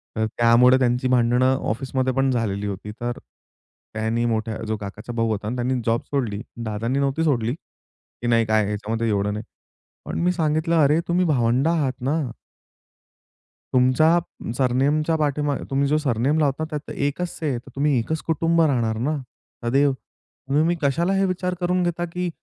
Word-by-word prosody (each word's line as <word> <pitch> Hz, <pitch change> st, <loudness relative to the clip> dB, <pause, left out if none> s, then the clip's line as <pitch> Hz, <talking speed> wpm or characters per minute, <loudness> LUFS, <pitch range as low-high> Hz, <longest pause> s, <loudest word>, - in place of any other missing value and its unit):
तर 110 Hz, -, +1 dB
त्यामुळे 120 Hz, +2 st, +6 dB
त्यांची 125 Hz, 0 st, +1 dB
भांडणं 125 Hz, +1 st, +3 dB
ऑफिसमध्ये 130 Hz, +2 st, -1 dB
पण 135 Hz, +1 st, +2 dB
झालेली 105 Hz, -4 st, -1 dB
होती. 100 Hz, +1 st, -5 dB
तर 120 Hz, 0 st, -2 dB, 0.8 s
त्यांनी 110 Hz, +2 st, -1 dB
मोठ्या 110 Hz, -1 st, -1 dB
जो 110 Hz, 0 st, -1 dB
काकाचा 105 Hz, +3 st, -7 dB
भाऊ 115 Hz, -1 st, 0 dB
होता. 105 Hz, 0 st, -3 dB
आणि 115 Hz, -, -2 dB
त्यांनी 125 Hz, +1 st, 0 dB
जॉब 115 Hz, 0 st, +1 dB
सोडली, 115 Hz, -8 st, -1 dB, 0.2 s
दादांनी 115 Hz, +5 st, -1 dB
नव्हती 140 Hz, +3 st, 0 dB
सोडली, 120 Hz, -7 st, +1 dB
की 130 Hz, -5 st, -12 dB
नाही 115 Hz, -1 st, +3 dB
काय 110 Hz, -1 st, +2 dB
ह्याच्यामध्ये 105 Hz, +3 st, -2 dB
एवढं 105 Hz, 0 st, 0 dB
नाही. 105 Hz, +1 st, -5 dB, 0.6 s
पण -, -, -4 dB
मी 180 Hz, +1 st, +3 dB
सांगितलं, 160 Hz, 0 st, +1 dB
"अरे, 150 Hz, +3 st, +3 dB
तुम्ही 180 Hz, +1 st, +2 dB
भावंड 130 Hz, -1 st, +2 dB
आहात 155 Hz, -6 st, +1 dB
ना." 140 Hz, +5 st, +1 dB, 1.6 s
तुमच्या 130 Hz, +7 st, +4 dB, 0.4 s
सरनेम 135 Hz, +4 st, +2 dB, 0.2 s
पाठीमागे 145 Hz, -1 st, 0 dB
तुम्ही 140 Hz, +1 st, +1 dB
जो 150 Hz, +2 st, +2 dB
सरनेम 140 Hz, +1 st, +1 dB
लावतात, 150 Hz, +1 st, +1 dB
त्यात 150 Hz, -2 st, -6 dB
एकच 145 Hz, +5 st, -2 dB
आहे, 145 Hz, -6 st, 0 dB
तर 120 Hz, -, -11 dB
तुम्ही 140 Hz, -1 st, +2 dB
एकच 160 Hz, +8 st, -2 dB
कुटुंब 165 Hz, +1 st, +2 dB
राहणार 120 Hz, -8 st, +1 dB
ना, 155 Hz, -, 0 dB, 0.5 s
सद्दैव. 135 Hz, +4 st, +3 dB
तुम्ही 135 Hz, +2 st, -4 dB
मग 175 Hz, +1 st, +1 dB
कशाला 170 Hz, +7 st, +1 dB
हे 195 Hz, 0 st, +2 dB
विचार 185 Hz, -1 st, -1 dB
करून 180 Hz, 0 st, +1 dB
घेता, 175 Hz, 0 st, -1 dB
की 175 Hz, +1 st, -3 dB
130 Hz, 165 wpm, -23 LUFS, 115-155 Hz, 1.6 s, त्यामुळे